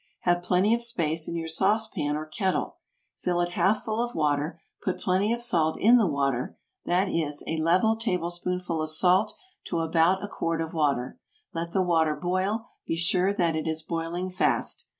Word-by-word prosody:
Have 175 Hz, 0 st, +2 dB
plenty 185 Hz, +5 st, +2 dB
of 235 Hz, -, +1 dB
space 165 Hz, -9 st, 0 dB
in -, -, -4 dB
your 165 Hz, -1 st, -3 dB
sauce 215 Hz, +7 st, +2 dB
pan 150 Hz, -8 st, -2 dB
or 155 Hz, -, -5 dB
kettle, 185 Hz, +5 st, -2 dB, 0.4 s
fill 175 Hz, -1 st, -1 dB
it 175 Hz, 0 st, +1 dB
half 195 Hz, +4 st, +1 dB
full 220 Hz, 0 st, -2 dB
of 240 Hz, -, -5 dB
water, 150 Hz, +2 st, 0 dB, 0.2 s
put 185 Hz, -, -2 dB
plenty 190 Hz, +3 st, +1 dB
of 235 Hz, 0 st, 0 dB
salt 165 Hz, -9 st, +1 dB
in 235 Hz, +4 st, +6 dB
the 215 Hz, -, +3 dB
water, 140 Hz, -4 st, -1 dB, 0.3 s
that 180 Hz, +3 st, +2 dB
is, 155 Hz, -5 st, -1 dB
a 160 Hz, -, -2 dB
level 180 Hz, +8 st, +3 dB
tablespoonful 180 Hz, -4 st, -2 dB
of 155 Hz, -, -2 dB
salt 180 Hz, +5 st, +3 dB, 0.3 s
to 170 Hz, -, -2 dB
about 165 Hz, +3 st, +2 dB
a -, -, -3 dB
quart 165 Hz, -4 st, -2 dB
of 165 Hz, 0 st, -3 dB
water, 145 Hz, -, 0 dB, 0.3 s
let 170 Hz, +1 st, -4 dB
the 190 Hz, -, +2 dB
water 160 Hz, -3 st, +2 dB
boil; 185 Hz, +7 st, -1 dB, 0.2 s
be -, -, 0 dB
sure 180 Hz, +3 st, +2 dB
that 170 Hz, -5 st, +1 dB
it 160 Hz, 0 st, -2 dB
is 160 Hz, 0 st, -2 dB
boiling 170 Hz, +3 st, -3 dB
fast. 180 Hz, -, 0 dB
175 Hz, 190 wpm, -27 LUFS, 160-190 Hz, 0.4 s, in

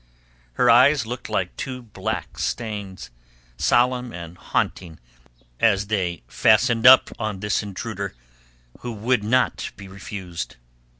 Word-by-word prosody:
Her -, -, +2 dB
eyes 130 Hz, +2 st, +6 dB
looked 125 Hz, +2 st, -6 dB
like -, -, -2 dB
two 125 Hz, -1 st, -5 dB
black 110 Hz, -, -5 dB
stains, 105 Hz, -, -4 dB, 0.4 s
solemn 125 Hz, -, +2 dB
and 85 Hz, -2 st, -8 dB
haunting 85 Hz, -1 st, -3 dB, 0.6 s
as 100 Hz, -3 st, +3 dB
they 90 Hz, -, -1 dB
fastened 115 Hz, -, +3 dB
up 130 Hz, +1 st, +8 dB
on 110 Hz, -3 st, -3 dB
this 105 Hz, +1 st, 0 dB
intruder 100 Hz, -, -5 dB, 0.6 s
who 120 Hz, -1 st, -5 dB
would 115 Hz, +1 st, 0 dB
not 125 Hz, +4 st, +1 dB
be 100 Hz, -, -11 dB
refused. 95 Hz, -2 st, -7 dB
110 Hz, 120 wpm, -23 LUFS, 95-125 Hz, 0.6 s, up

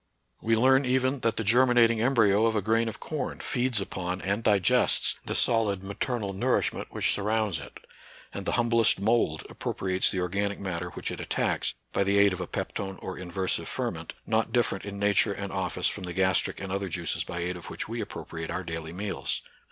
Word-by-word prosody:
We 115 Hz, 0 st, +2 dB
learn, 130 Hz, +3 st, +5 dB
even, 130 Hz, +1 st, +1 dB
that 115 Hz, -2 st, 0 dB
the 115 Hz, -, 0 dB
germinating 115 Hz, 0 st, +4 dB
embryo 115 Hz, -4 st, +4 dB
of 110 Hz, -, 0 dB
a 105 Hz, -, +2 dB
grain 115 Hz, +2 st, +2 dB
of 110 Hz, -, -8 dB
corn 150 Hz, -5 st, -4 dB
feeds 125 Hz, -3 st, 0 dB
upon 90 Hz, -1 st, -3 dB
and 100 Hz, +4 st, -1 dB
digests 100 Hz, -5 st, +3 dB
the -, -, -2 dB
solid 105 Hz, -5 st, +1 dB
maternal 100 Hz, +1 st, -2 dB
nourishment 95 Hz, -, 0 dB
which -, -, +1 dB
surrounds 105 Hz, -4 st, 0 dB
it, -, -, -10 dB, 0.6 s
and 100 Hz, -, -6 dB
the -, -, 0 dB
humblest 115 Hz, -4 st, +4 dB
mould 100 Hz, -7 st, +1 dB
appropriates 95 Hz, -1 st, -1 dB
the 95 Hz, -, -1 dB
organic 100 Hz, +3 st, -1 dB
matter 90 Hz, -2 st, -3 dB
which -, -, -5 dB
it -, -, -6 dB
attacks, -, -, -1 dB, 0.2 s
by -, -, +2 dB
the 100 Hz, +1 st, +2 dB
aid 100 Hz, -1 st, +5 dB
of 90 Hz, -, -5 dB
a 90 Hz, -, -4 dB
peptone 95 Hz, -1 st, -4 dB
or 95 Hz, -, -6 dB
inversive 90 Hz, +1 st, -2 dB
ferment, -, -, -4 dB
not 110 Hz, 0 st, +1 dB
different 120 Hz, -6 st, +1 dB
in 100 Hz, -1 st, -6 dB
nature 100 Hz, +1 st, +3 dB
and 100 Hz, 0 st, -5 dB
office 95 Hz, -2 st, -2 dB
from -, -, -3 dB
the 90 Hz, -, -5 dB
gastric 95 Hz, 0 st, +2 dB
and 95 Hz, -1 st, -5 dB
other 100 Hz, 0 st, -2 dB
juices 85 Hz, -1 st, -1 dB
by 85 Hz, -, -6 dB
aid 90 Hz, +1 st, -2 dB
of 85 Hz, -, -9 dB
which -, -, -5 dB
we -, -, -4 dB
appropriate 80 Hz, -1 st, -6 dB
our 90 Hz, +2 st, -3 dB
daily 80 Hz, -1 st, -5 dB
meals. 100 Hz, +2 st, -2 dB
100 Hz, 195 wpm, -28 LUFS, 95-115 Hz, 0.6 s, learn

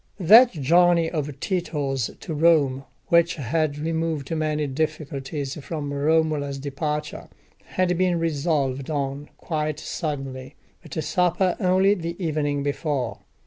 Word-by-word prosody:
That 225 Hz, +8 st, +8 dB
journey 170 Hz, +2 st, +3 dB
of 150 Hz, -4 st, -4 dB
Tito's 145 Hz, -, -1 dB
to 165 Hz, -, -5 dB
Rome, 145 Hz, -4 st, +3 dB, 0.2 s
which 170 Hz, 0 st, +4 dB
had 150 Hz, +1 st, -1 dB
removed 160 Hz, -1 st, -2 dB
many 155 Hz, -1 st, 0 dB
difficulties 140 Hz, -1 st, -3 dB
from 145 Hz, -3 st, -4 dB
Romola's 150 Hz, -1 st, +1 dB
departure, 150 Hz, +2 st, -4 dB, 0.4 s
had 180 Hz, -1 st, 0 dB
been 180 Hz, -2 st, +2 dB
resolved 145 Hz, -4 st, -1 dB
on 140 Hz, -1 st, -3 dB
quite 155 Hz, -2 st, -3 dB
suddenly, 135 Hz, -3 st, -5 dB, 0.3 s
at 160 Hz, -3 st, -9 dB
a 160 Hz, -, -1 dB
supper, 180 Hz, +1 st, +1 dB
only 190 Hz, 0 st, +4 dB
the 170 Hz, -3 st, -4 dB
evening 150 Hz, -5 st, -1 dB
before. 140 Hz, -6 st, -2 dB
155 Hz, 120 wpm, -24 LUFS, 140-165 Hz, 0.4 s, That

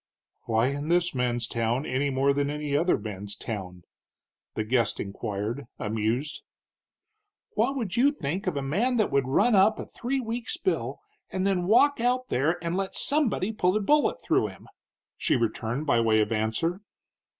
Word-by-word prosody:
"Why 115 Hz, +2 st, +2 dB
in 145 Hz, +2 st, -4 dB
this 175 Hz, +1 st, +2 dB
man's 120 Hz, -2 st, 0 dB
town, 115 Hz, +4 st, -1 dB
any 135 Hz, +3 st, 0 dB
more 135 Hz, +1 st, +2 dB
than 140 Hz, 0 st, 0 dB
any 150 Hz, -1 st, -2 dB
other 170 Hz, +5 st, +3 dB
man's 105 Hz, -1 st, -6 dB
town?" 90 Hz, -6 st, -6 dB, 0.7 s
the 110 Hz, -, -1 dB
guest 115 Hz, -1 st, +1 dB
inquired, 105 Hz, +5 st, -4 dB
amused. 110 Hz, +7 st, -2 dB, 1.1 s
"What 275 Hz, -9 st, +1 dB
would 225 Hz, -9 st, -3 dB
you 270 Hz, +4 st, +4 dB
think 180 Hz, -, -4 dB
of 145 Hz, -, 0 dB
a 140 Hz, -, -2 dB
man 220 Hz, -, +1 dB
that 215 Hz, -, +1 dB
would 135 Hz, -2 st, +2 dB
run 230 Hz, -, +3 dB
up 205 Hz, +2 st, +5 dB
a -, -, -5 dB
three 265 Hz, +3 st, -3 dB
weeks' 235 Hz, +5 st, -3 dB
bill 375 Hz, +2 st, -1 dB, 0.3 s
and 185 Hz, 0 st, -2 dB
then 185 Hz, -3 st, +1 dB
walk 285 Hz, +7 st, +5 dB
out 250 Hz, +2 st, +1 dB
there 155 Hz, +7 st, +1 dB
and 170 Hz, +1 st, -1 dB
let 195 Hz, 0 st, -2 dB
somebody 255 Hz, -9 st, +1 dB
put 185 Hz, -3 st, +1 dB
a -, -, +1 dB
bullet 295 Hz, -, +2 dB
through -, -, +2 dB
him?" -, -, -13 dB, 0.5 s
she -, -, +1 dB
returned 120 Hz, +3 st, -1 dB
by 120 Hz, -5 st, +3 dB
way 110 Hz, -1 st, +3 dB
of 105 Hz, +1 st, +1 dB
answer. 115 Hz, -, -1 dB
145 Hz, 170 wpm, -27 LUFS, -, 1.1 s, up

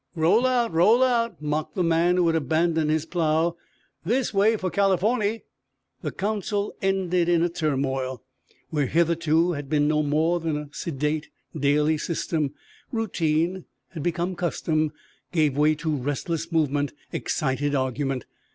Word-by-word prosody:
"Roll 175 Hz, +10 st, +3 dB
out! 240 Hz, -6 st, +1 dB
Roll 210 Hz, +10 st, +5 dB
out!" 235 Hz, -3 st, +1 dB
mocked 150 Hz, +1 st, -2 dB
the 185 Hz, -, +1 dB
man 170 Hz, +1 st, +3 dB
who 180 Hz, -1 st, +3 dB
had 165 Hz, -1 st, +2 dB
abandoned 160 Hz, 0 st, +1 dB
his 155 Hz, 0 st, +1 dB
plow. 165 Hz, 0 st, +1 dB, 0.5 s
"This 235 Hz, +8 st, 0 dB
way 210 Hz, +3 st, +3 dB
for 185 Hz, -3 st, -3 dB
Californy!" 205 Hz, +3 st, +1 dB, 0.6 s
The -, -, -3 dB
council 205 Hz, 0 st, -2 dB
ended 185 Hz, -3 st, +1 dB
in 170 Hz, 0 st, +3 dB
turmoil, 135 Hz, -6 st, -2 dB, 0.5 s
where 145 Hz, -4 st, +1 dB
hitherto 170 Hz, +1 st, +2 dB
had 145 Hz, -4 st, -5 dB
been 145 Hz, -1 st, +2 dB
no 150 Hz, 0 st, +2 dB
more 155 Hz, +4 st, +1 dB
than 160 Hz, -2 st, -2 dB
a 150 Hz, -1 st, -6 dB
sedate 150 Hz, 0 st, -2 dB, 0.3 s
daily 150 Hz, +1 st, +2 dB
system. 155 Hz, -3 st, -2 dB, 0.4 s
Routine, 175 Hz, -5 st, 0 dB, 0.4 s
become 175 Hz, +3 st, -1 dB
custom, 155 Hz, -3 st, 0 dB, 0.4 s
gave 155 Hz, -5 st, +2 dB
way 150 Hz, +2 st, +3 dB
to 155 Hz, 0 st, -2 dB
restless 145 Hz, +5 st, -3 dB
movement, 145 Hz, -3 st, +1 dB, 0.2 s
excited 145 Hz, +1 st, -1 dB
argument. 130 Hz, -1 st, -1 dB
165 Hz, 135 wpm, -25 LUFS, 150-180 Hz, 0.6 s, Roll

